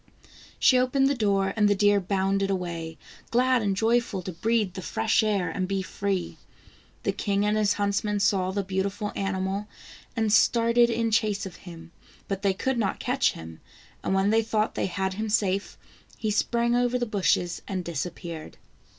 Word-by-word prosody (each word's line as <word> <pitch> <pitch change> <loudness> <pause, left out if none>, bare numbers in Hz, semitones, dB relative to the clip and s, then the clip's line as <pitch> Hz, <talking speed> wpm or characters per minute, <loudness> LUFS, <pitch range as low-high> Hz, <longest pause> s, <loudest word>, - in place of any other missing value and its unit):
She 255 - +5
opened 255 +2 +2
the 280 - +2
door 200 -5 +1
and 210 -2 +3
the 205 - +3
deer 205 +1 +4
bounded 195 +1 0
away, 170 -4 -3 0.3
glad 255 +1 +3
and 200 -2 0
joyful 230 -4 +1
to 185 - -5
breathe 215 +2 0
the 190 - -6
fresh 220 +4 +1
air, 205 -4 0
and 185 +1 -2
be 195 0 -1
free. 195 -1 -3 0.6
The - - +1
king 200 -1 -1
and 210 0 +2
his 210 -1 +2
huntsmen 205 0 0
saw 195 -2 +2
the 200 +1 -1
beautiful 195 +2 -2
animal, 195 +1 -2 0.5
and 220 -2 +1
started 235 +2 +4
in 230 -1 0
chase 210 -2 +1
of 185 - -8
him, 165 -1 -10 0.4
but 195 -1 -3
they 195 -2 +1
could 260 +5 -1
not 200 -4 -1
catch 250 +2 +1
him, 80 0 -10 0.4
and 190 - 0
when 195 +2 +2
they 225 +1 +4
thought 220 -1 0
they - - -1
had 190 0 -2
him 215 +3 -3
safe, 200 -2 0 0.4
he 215 - -1
sprang 235 +3 +1
over 245 0 +2
the 245 - -1
bushes 190 -5 0
and 185 -3 -3
disappeared. 170 0 -6
200 Hz, 175 wpm, -26 LUFS, 190-220 Hz, 0.6 s, She